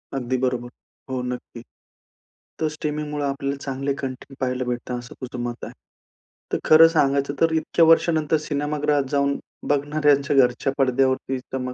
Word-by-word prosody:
अगदी 130 Hz, -1 st, -1 dB
बरोबर. 125 Hz, -1 st, -1 dB, 0.4 s
हो, 130 Hz, -1 st, -2 dB
नक्की. 125 Hz, -1 st, -6 dB, 1.0 s
तर 160 Hz, -, +1 dB
स्ट्रीमिंगमुळं 150 Hz, -1 st, -3 dB
आपल्याला 140 Hz, 0 st, -2 dB
चांगले 140 Hz, 0 st, -2 dB
कॉन्टेंट 135 Hz, +1 st, -7 dB
पाहायला 130 Hz, -1 st, -1 dB
भेटतं, 125 Hz, 0 st, -3 dB
असं 120 Hz, -, -11 dB
तुझं 125 Hz, -1 st, -6 dB
मत 120 Hz, 0 st, -5 dB
आहे. -, -, -9 dB, 0.8 s
तर -, -, +3 dB
खरं 160 Hz, +1 st, +8 dB
सांगायचं 140 Hz, -3 st, +1 dB
तर, 165 Hz, 0 st, +4 dB
इतक्या 160 Hz, +1 st, +3 dB
वर्षानंतर 160 Hz, -1 st, +3 dB
सिनेमागृहात 150 Hz, -1 st, 0 dB
जाऊन 140 Hz, 0 st, +1 dB, 0.3 s
बघणाऱ्यांच्या 145 Hz, -1 st, +2 dB
घरच्या 125 Hz, +1 st, +3 dB
पडद्यावरती 130 Hz, 0 st, +1 dB
चमक, 125 Hz, 0 st, -5 dB
140 Hz, 140 wpm, -23 LUFS, 130-150 Hz, 1.0 s, खरं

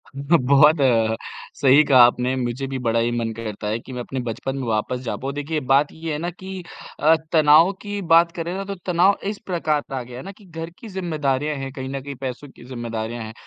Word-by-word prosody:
बहुत 140 Hz, +1 st, +4 dB, 0.9 s
सही 140 Hz, +2 st, +6 dB
कहा 130 Hz, -4 st, +5 dB
आपने। 125 Hz, +1 st, +1 dB
मुझे 125 Hz, +2 st, -3 dB
भी 135 Hz, -1 st, -4 dB
बड़ा 115 Hz, -1 st, +1 dB
ही 120 Hz, +1 st, +1 dB
मन 115 Hz, -1 st, -1 dB
करता 105 Hz, -2 st, -5 dB
है 110 Hz, +2 st, -1 dB
कि 130 Hz, -, -11 dB
मैं 125 Hz, -, -4 dB
अपने 130 Hz, +2 st, -5 dB
बचपन 125 Hz, +4 st, -3 dB
में 130 Hz, -3 st, -4 dB
वापस 115 Hz, +3 st, -1 dB
जा 115 Hz, -, -3 dB
पाऊँ। 135 Hz, +1 st, -4 dB
देखिए, 150 Hz, +2 st, -2 dB
बात 135 Hz, +2 st, +2 dB
ये 160 Hz, 0 st, -6 dB
है -, -, -2 dB
ना 175 Hz, +1 st, -2 dB
कि 185 Hz, +1 st, -8 dB, 0.4 s
अ, 160 Hz, +2 st, +5 dB, 0.2 s
तनाव 160 Hz, +3 st, +6 dB
की 205 Hz, -1 st, -4 dB
बात 165 Hz, 0 st, +4 dB
करें 170 Hz, +1 st, -3 dB
ना 195 Hz, -, -3 dB
तो 200 Hz, 0 st, -5 dB
तनाव 180 Hz, +2 st, +3 dB
इस 210 Hz, -, -5 dB
प्रकार 160 Hz, -5 st, 0 dB
आ 130 Hz, -, -2 dB
गया 125 Hz, 0 st, -10 dB
है -, -, -8 dB
ना 195 Hz, -, -7 dB
कि 200 Hz, 0 st, -19 dB
घर 165 Hz, -1 st, -7 dB
की 230 Hz, -, -10 dB
ज़िम्मेदारियाँ 150 Hz, -6 st, -1 dB
हैं 135 Hz, 0 st, -5 dB
कहीं 130 Hz, -2 st, -6 dB
न 135 Hz, 0 st, -4 dB
कहीं, 140 Hz, 0 st, -7 dB
पैसों 130 Hz, +2 st, -6 dB
की 120 Hz, -, -16 dB
ज़िम्मेदारियाँ 120 Hz, -2 st, -5 dB
हैं 110 Hz, 0 st, -8 dB
140 Hz, 225 wpm, -22 LUFS, 125-165 Hz, 0.9 s, सही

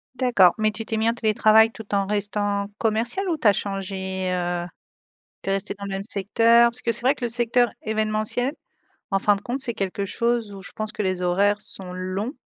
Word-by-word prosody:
D'accord, 240 Hz, -8 st, +4 dB
mais 215 Hz, 0 st, +3 dB
tu 220 Hz, +1 st, -5 dB
t'es 225 Hz, -, -2 dB
mis 225 Hz, +1 st, +2 dB
en 230 Hz, -, -1 dB
télétravail 220 Hz, 0 st, +4 dB
tout 220 Hz, -2 st, -11 dB
en 195 Hz, -1 st, +1 dB
restant 205 Hz, 0 st, -1 dB
commercial 235 Hz, -, 0 dB
ou 325 Hz, -, 0 dB
tu 235 Hz, -, +2 dB
as 205 Hz, -, +7 dB
changé, 190 Hz, -1 st, -3 dB
heu? 175 Hz, -1 st, -2 dB, 0.8 s
Tu -, -, -3 dB
es -, -, +2 dB
resté 195 Hz, +1 st, -1 dB
dans 200 Hz, -, -7 dB
le 200 Hz, -, -5 dB
même 195 Hz, 0 st, -3 dB
secteur? 230 Hz, +3 st, +4 dB
Parce 245 Hz, +2 st, -9 dB
que 235 Hz, -, -1 dB
c'est 235 Hz, +1 st, -1 dB
vrai 265 Hz, +3 st, +4 dB
que 255 Hz, -, -6 dB
le -, -, 0 dB
secteur 240 Hz, +1 st, +2 dB
événementiel, 215 Hz, +5 st, -1 dB, 0.6 s
en 195 Hz, -, +2 dB
fin 205 Hz, +1 st, +3 dB
de 200 Hz, -, -8 dB
compte, 250 Hz, +5 st, -3 dB
c'est 240 Hz, -3 st, -2 dB
quelque 200 Hz, -1 st, -3 dB
chose 235 Hz, 0 st, -1 dB
où 195 Hz, -, -9 dB
je -, -, -8 dB
pense 215 Hz, 0 st, -3 dB
que -, -, -4 dB
les 185 Hz, -2 st, -1 dB
horaires 200 Hz, +4 st, +2 dB
sont 185 Hz, -2 st, -7 dB
longs 185 Hz, +7 st, -4 dB
210 Hz, 220 wpm, -23 LUFS, 195-235 Hz, 0.8 s, as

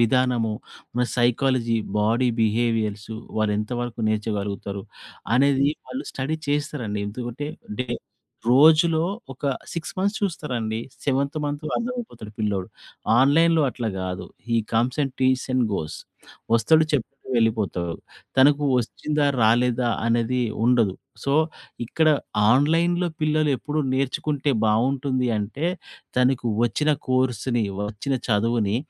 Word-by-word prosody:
విధానము, 120 Hz, -1 st, +2 dB, 0.4 s
మ 125 Hz, -, +3 dB
psychology, 120 Hz, -1 st, +2 dB, 0.2 s
body 115 Hz, +4 st, +2 dB
బిహేవియర్సు, 110 Hz, -1 st, 0 dB, 0.2 s
వాళ్ళేంత 105 Hz, 0 st, 0 dB
వరకు 120 Hz, -1 st, -4 dB
నేర్చగలుగుతారు, 100 Hz, -2 st, -2 dB, 0.5 s
అనేది 140 Hz, +1 st, +4 dB, 0.2 s
వాళ్ళు 265 Hz, -, -5 dB
స్టడీ 140 Hz, +4 st, -2 dB
చేసేశారండి. 145 Hz, -8 st, -1 dB
ఎందుకంటే, 120 Hz, +6 st, -5 dB, 0.3 s
డే 125 Hz, -, -3 dB, 0.6 s
రోజులో 160 Hz, +4 st, +6 dB, 0.3 s
ఒక 135 Hz, -, -11 dB, 0.3 s
6 165 Hz, -3 st, -5 dB
మంత్స్ 200 Hz, +3 st, +1 dB
చూస్తారండి, 125 Hz, -, -2 dB, 0.3 s
సెవెంత్ 140 Hz, +1 st, 0 dB
మంతు 145 Hz, +1 st, -3 dB
అర్థమైపోతాడు 235 Hz, -, -5 dB
పిల్లోడు. 100 Hz, -4 st, -1 dB, 0.5 s
ఆన్‌లైన్‌లో 160 Hz, +4 st, +4 dB
అట్లా 120 Hz, -2 st, -3 dB
గాదు, 90 Hz, 0 st, -4 dB, 0.2 s
he 115 Hz, -, +2 dB, 0.2 s
comes 120 Hz, +5 st, +1 dB
and, 135 Hz, -2 st, -2 dB
teas 130 Hz, 0 st, +3 dB
and 125 Hz, -, +3 dB
goes 75 Hz, -2 st, -4 dB, 0.6 s
వస్తడు, 155 Hz, +8 st, +5 dB
చెప్తడు, 135 Hz, -6 st, 0 dB, 0.3 s
వెళ్ళిపోతా 110 Hz, -5 st, +1 dB, 0.5 s
తనకు 145 Hz, +2 st, +5 dB
వచ్చిందా, 150 Hz, +5 st, -1 dB, 0.2 s
రాలేదా 120 Hz, +2 st, +3 dB, 0.2 s
అనేది 120 Hz, +2 st, +1 dB, 0.2 s
ఉండదు. 115 Hz, -6 st, +3 dB, 0.3 s
సో, 140 Hz, -, +1 dB, 0.5 s
ఇక్కడ 160 Hz, +7 st, +2 dB, 0.4 s
ఆన్‌లైన్‌లో 165 Hz, +7 st, +3 dB
పిల్లలెప్పుడు 150 Hz, -1 st, +1 dB
నేర్చుకుంటే 140 Hz, +2 st, 0 dB, 0.2 s
బావుంటుంది 130 Hz, +3 st, +1 dB
అంటే, 115 Hz, +11 st, -2 dB, 0.5 s
తనకు 125 Hz, -1 st, +2 dB, 0.2 s
వచ్చిన 150 Hz, +7 st, +1 dB, 0.2 s
కోర్సుని, 125 Hz, -2 st, +1 dB, 0.2 s
వచ్చిన 110 Hz, +6 st, -2 dB
చదువుని, 110 Hz, -1 st, +1 dB
125 Hz, 110 wpm, -24 LUFS, 110-145 Hz, 0.6 s, రోజులో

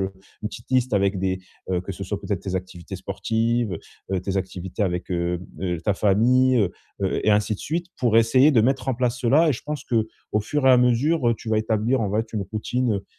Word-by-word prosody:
heu, 95 Hz, 0 st, -2 dB, 0.3 s
une 105 Hz, -, -1 dB
petite 115 Hz, -, -11 dB
liste, 130 Hz, -3 st, +2 dB
avec 100 Hz, -1 st, +2 dB
des, 95 Hz, 0 st, -1 dB, 0.3 s
heu, 90 Hz, -1 st, +1 dB
que 95 Hz, -, -8 dB
ce 95 Hz, +1 st, -6 dB
soit 100 Hz, +1 st, -4 dB
peut-être 100 Hz, -3 st, -2 dB
tes 95 Hz, -1 st, -4 dB
activités 90 Hz, -2 st, -7 dB
sportives, 115 Hz, -3 st, -1 dB, 0.4 s
heu, 95 Hz, -, +1 dB
tes 95 Hz, +1 st, -3 dB
activités 95 Hz, +1 st, -3 dB
avec, 90 Hz, -1 st, -3 dB
heu 85 Hz, 0 st, -1 dB, 0.2 s
heu, 90 Hz, -3 st, -2 dB
ta 100 Hz, -, +1 dB
famille, 125 Hz, +6 st, +3 dB
heu 100 Hz, -5 st, +2 dB, 0.3 s
heu, 95 Hz, -, 0 dB
et 110 Hz, -, +5 dB
ainsi 105 Hz, +1 st, +2 dB
de -, -, -9 dB
suite, 170 Hz, +3 st, -2 dB
pour 120 Hz, -4 st, +2 dB
essayer 130 Hz, +6 st, +5 dB
de 115 Hz, -, +5 dB
mettre 130 Hz, +2 st, +1 dB
en 130 Hz, -, +2 dB
place 125 Hz, 0 st, -1 dB
cela. 140 Hz, +7 st, +4 dB
Et -, -, +3 dB
je 125 Hz, -, -6 dB
pense 150 Hz, -3 st, -3 dB
qu'au 110 Hz, -2 st, -2 dB
fur 140 Hz, +7 st, -2 dB
et -, -, +8 dB
à 130 Hz, -, +7 dB
mesure, 125 Hz, +3 st, +3 dB
heu, 115 Hz, -, +3 dB
tu 110 Hz, -, -9 dB
vas 110 Hz, -, +2 dB
établir, 110 Hz, +3 st, +1 dB
en 105 Hz, -3 st, -1 dB
fait, 110 Hz, +1 st, -1 dB
une 105 Hz, -3 st, -1 dB
routine, 120 Hz, +2 st, 0 dB
heu 100 Hz, -, -4 dB
110 Hz, 235 wpm, -24 LUFS, 95-125 Hz, 0.4 s, et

